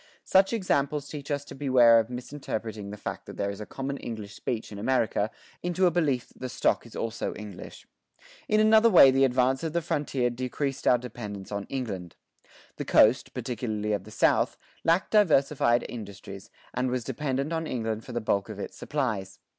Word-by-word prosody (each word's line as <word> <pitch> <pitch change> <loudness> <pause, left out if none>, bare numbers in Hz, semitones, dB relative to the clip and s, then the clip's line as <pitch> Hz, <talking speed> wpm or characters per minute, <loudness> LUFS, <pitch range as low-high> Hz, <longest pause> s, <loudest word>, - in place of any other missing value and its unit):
[23:2] - - -32
Such 190 +3 +5
examples 145 -8 0
teach 145 -2 -7
us 145 -1 -2
to - - -10
beware 125 -4 +5
of 110 0 -2
misinterpreting 115 -5 -5
the 105 - -7
fact - - -6
that - - -9
there 100 0 -1
is 100 +1 -8
a 105 - -7
common 135 +1 -4
English 110 -5 -7
speech 115 0 -4
in 100 - -7
America 110 -3 +1 0.3
into 180 +1 +1
a 175 - +4
belief 145 -8 0
that - - -22
the 130 - -4
stock 120 - 0
is 115 - -14
also 115 0 -3
English. 105 -4 -9 0.6
In 215 - +3
another 220 +1 +6
way 155 -9 +8
the 135 +1 +3
advance 130 0 +2
of 160 -2 -3
the 170 - +1
frontier 140 -6 0
decreased 130 +3 -3
our 125 - +6
dependence 105 -5 -7
on 100 -1 -3
England. 100 -10 -5 0.6
The - - -4
coast, 110 +4 +4
particularly 110 -4 -2
of 100 -2 -2
the - - -11
South, - - +2 0.3
lacked 170 +4 +2
diversified 145 - +3
industries, 100 -4 -9 0.2
and 125 +1 0
was 125 -1 -1
dependent 135 +3 -2
on 160 -1 -2
England 110 -4 -3
for - - -9
the 120 - -1
bulk 100 -1 0
of 105 - -7
its 100 - -6
supplies. 110 -10 -3
125 Hz, 190 wpm, -27 LUFS, 110-145 Hz, 0.6 s, way